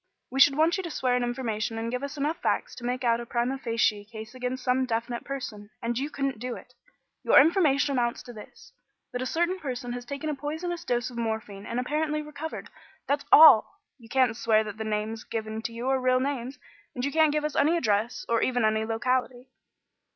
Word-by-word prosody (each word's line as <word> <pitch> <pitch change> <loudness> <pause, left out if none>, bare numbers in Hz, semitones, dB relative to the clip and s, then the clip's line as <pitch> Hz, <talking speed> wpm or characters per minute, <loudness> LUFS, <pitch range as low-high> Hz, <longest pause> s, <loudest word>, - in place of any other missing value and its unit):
We 265 - -2
should 275 0 +6
want 325 +4 +3
you 380 - -3
to 340 - -5
swear 255 -5 0
an 250 - +1
information 230 -3 -2
and 230 +1 -3
give 250 +1 -2
us 280 +1 -6
enough 295 +4 -1
facts - - -1
to 245 - -11
make 250 +1 -2
out 235 -1 +2
a 240 - -6
primâ 250 +3 -1
facie 225 -3 +1
case 220 +1 -10
against 255 0 -4
some 255 +1 +1
definite 235 +1 -2
person. 235 -7 -6
And 235 -1 -2
you 275 +5 -2
couldn't 275 -5 -3
do 245 +1 -4
it. - - -13 0.5
Your - - +7
information 295 -2 +3
amounts 240 -3 -1
to 245 - -10
this: 215 - -13 0.4
that 245 - -3
a 255 - -2
certain 345 +5 0
person 250 -5 -4
has 245 0 -5
taken 280 +5 -5
a 305 - 0
poisonous 320 +5 -4
dose 240 +1 -1
of 235 - -6
morphine 220 -3 -4
and 235 - -2
apparently 300 +3 -1
recovered. 300 +1 -7 0.3
That's 285 +1 -1
all. 290 -2 +8 0.2
You 230 -2 -16
can't 255 -3 +2
swear 220 -2 +2
that 215 0 -7
the 220 - -4
names 215 +1 -3
given 220 -1 -4
to 230 - -4
you 235 +2 -5
are 265 -1 +1
real 255 0 +3
names, 265 -1 -3 0.4
and 250 0 -2
you 280 - -1
can't 315 0 +4
give 300 0 0
us 300 - -3
any 320 +4 +3
address 215 -5 0
or 230 -1 +1
even 245 -3 +1
any 220 0 +2
locality." 250 +2 -1
250 Hz, 215 wpm, -27 LUFS, 230-280 Hz, 0.5 s, all